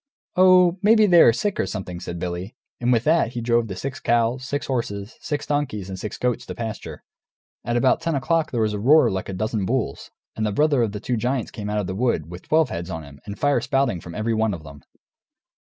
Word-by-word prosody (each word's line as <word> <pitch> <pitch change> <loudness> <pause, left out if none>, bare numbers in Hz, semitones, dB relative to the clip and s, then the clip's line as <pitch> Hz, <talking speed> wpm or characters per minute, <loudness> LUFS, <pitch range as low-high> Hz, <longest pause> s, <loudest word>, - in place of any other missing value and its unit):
"Oh, 185 -1 +5
maybe 215 +1 +5
they 175 -4 +6
are - - +8
sick 200 - -2
or - - +1
something," 90 -2 -5
says 85 - -6
Billy; 90 +5 -5 0.2
and 125 +1 +1
with 115 -2 +3
that 155 -6 +2
he 120 - -3
drove 115 0 +1
the 95 - -6
six 130 +7 -5
cows, 120 +2 +1
six 145 +2 -3
horses, 110 -4 -3
six 145 -1 -3
donkeys, 135 -10 -2
and 95 -1 -6
six 105 - -5
goats 125 -1 -1
to - - -6
pasture. 115 -2 -6 0.6
At 120 +1 -1
about 130 +1 +3
ten 165 -2 -1
o'clock 160 +4 +1
there 120 - -1
was 110 -1 +1
a 105 - -3
roar 145 +9 +5
like 95 0 -4
a - - -4
dozen 110 +2 -2
bulls, 120 +5 -2 0.3
and 110 - -2
the 105 - 0
brother 145 +3 +2
of 110 -3 0
the 105 - -4
two 120 +3 -2
giants 125 +1 -1
came 105 -1 -6
out 105 - -1
of 105 - -1
the 95 - -4
wood, 95 -7 -1
with 90 +1 -10
twelve 155 -3 +3
heads 85 +2 -5
on 80 -3 -5
him, 70 -1 -13
and 100 +1 -6
fire 145 -1 +2
spouting 130 -10 0
from 85 - -9
every 110 +2 -1
one 110 -2 +1
of 80 - -11
them. 70 -1 -12
115 Hz, 240 wpm, -23 LUFS, 100-140 Hz, 0.6 s, are